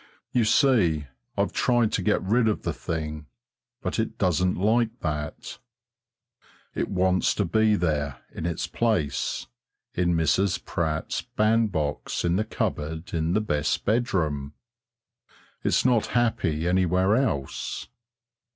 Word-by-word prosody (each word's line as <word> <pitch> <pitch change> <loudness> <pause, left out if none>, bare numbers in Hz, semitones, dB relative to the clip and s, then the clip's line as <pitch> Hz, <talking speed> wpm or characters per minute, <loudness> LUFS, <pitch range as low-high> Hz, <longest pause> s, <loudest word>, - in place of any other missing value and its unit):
You 125 -3 +2
see, 105 - +3 0.3
I've - - 0
tried 120 -3 +2
to - - 0
get 105 -3 +1
rid 110 +5 +2
of 105 - 0
the - - -1
thing, 75 -2 -4 0.6
but - - -2
it 110 - -2
doesn't 90 -1 +2
like 115 +4 +1
that. 75 -2 -4 1.1
It - - -2
wants 95 -1 +2
to 100 - +1
be 110 +4 +3
there 75 -7 -1
in 80 - -3
its 85 -1 -2
place, 85 - -1 0.5
in 85 -1 +1
Mrs. 85 +3 +1
Pratt's 80 -2 -2
bandbox 105 -11 0
in 85 0 +2
the 105 - +2
cupboard 80 0 -3
in 80 0 0
the 105 - +2
best 75 -7 -1
bedroom. 80 - 0 1.1
It's - - +2
not 120 -4 +3
happy 85 -9 +1
anywhere 95 +2 +3
else. 75 - -2
90 Hz, 125 wpm, -26 LUFS, 80-110 Hz, 1.1 s, see